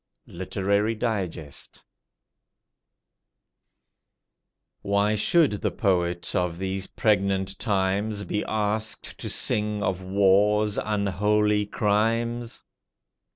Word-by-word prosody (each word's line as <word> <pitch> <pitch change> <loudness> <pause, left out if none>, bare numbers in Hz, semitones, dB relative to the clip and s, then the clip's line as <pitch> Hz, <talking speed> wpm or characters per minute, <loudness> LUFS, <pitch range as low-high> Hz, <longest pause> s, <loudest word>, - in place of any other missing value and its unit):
Literary 100 +4 -1
Digest. 95 - -4 3.0
Why 100 +1 +1
should 145 +8 +3
the - - +1
poet 90 -5 0
of 90 -2 0
these 95 +1 -3
pregnant 95 -2 0
times 100 0 0
Be 105 +2 -2
asked 110 +1 -2
to - - -5
sing 105 -1 0
of 95 -1 -1
war's 100 +2 +3
unholy 105 +1 +1
crimes? 115 +3 0
100 Hz, 80 wpm, -25 LUFS, 95-105 Hz, 3.0 s, should